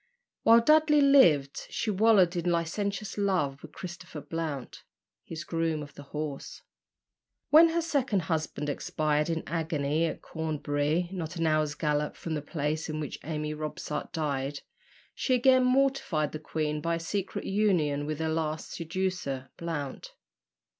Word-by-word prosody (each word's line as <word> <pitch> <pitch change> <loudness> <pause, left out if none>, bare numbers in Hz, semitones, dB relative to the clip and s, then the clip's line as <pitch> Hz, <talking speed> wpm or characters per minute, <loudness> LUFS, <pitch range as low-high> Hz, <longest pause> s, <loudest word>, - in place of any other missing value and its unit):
While 230 +1 +7
Dudley 305 +3 +5
lived, 175 - +5
she 220 - -1
wallowed 200 -3 +4
in 175 0 0
licentious 200 +5 -2
love 150 -9 0
with - - -11
Christopher 175 -3 -8
Blount, 150 -3 -5 0.4
his 160 -2 -7
groom 165 -1 -1
of 145 - -12
the - - -11
horse. 150 -2 -5 0.9
When 325 +2 +8
her 335 +1 0
second 270 - +1
husband 155 -3 -2
expired 150 +1 0
in 165 -1 -1
agony 160 -1 0
at - - -6
Cornbury, 155 +1 -1
not 175 -2 -5
an 165 -1 -1
hour's 155 -1 +1
gallop 150 -1 -1
from 165 - -5
the 150 - -2
place 155 +1 -2
in 155 0 -3
which 150 -3 -5
Amy 150 -1 -3
Robsart 150 0 -5
died, 140 -2 -2 0.5
she 255 - +1
again 255 +1 +5
mortified 255 - +2
the 155 - -5
queen 150 -1 -2
by 170 +2 0
a - - -3
secret 190 +4 -3
union 170 -8 +1
with 155 -1 -2
her 160 0 -1
last 155 -1 -2
seducer, 165 -6 -3
Blount. 155 -5 -5
160 Hz, 145 wpm, -29 LUFS, 150-190 Hz, 0.9 s, When